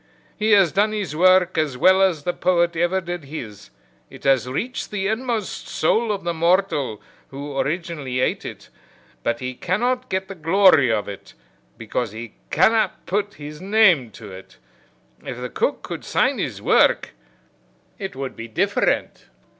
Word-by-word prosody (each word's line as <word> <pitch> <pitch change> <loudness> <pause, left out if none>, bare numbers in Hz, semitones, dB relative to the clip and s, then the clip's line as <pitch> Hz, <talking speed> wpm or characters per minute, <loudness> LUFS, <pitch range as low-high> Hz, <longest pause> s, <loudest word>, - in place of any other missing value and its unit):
He 215 0 +2
has 195 -5 +5
done 210 +2 +2
his 195 -8 -3
work 185 0 +4
as 145 -5 -1
well 185 +7 +5
as 175 -6 +2
the 175 - -1
poet 175 -1 +1
ever 175 +3 +1
did 175 -3 -6
his, 110 -9 -8 0.4
it - - -14
has 135 -2 +2
reached 245 - -3
the 200 -2 -3
inmost 220 0 -2
soul 220 +7 +1
of 200 - -3
the 170 0 -1
mortal 170 - +1 0.2
who 140 +1 -7
originally 150 -5 -2
ate 130 - 0
it, - - -9 0.5
but 115 +1 -2
he 130 0 -3
cannot 245 - -1
get 190 0 -2
the 195 - -7
glory 165 -6 +4
of 105 -2 -1
it 100 -1 -10 0.4
because 115 0 -3
he 115 0 -8 0.2
cannot 220 +7 +2
put 205 +2 -2
his 150 +1 -9
name 190 - +4
to 105 -3 -11
it. 95 -7 -12 0.7
If - - -6
the - - -5
cook - - -1
could - - -6
sign - - +1
his - - -4
work - - +3 0.9
it 195 - -5
would 135 0 -5
be 115 - -7
different." 110 - 0
170 Hz, 160 wpm, -22 LUFS, 135-195 Hz, 0.9 s, has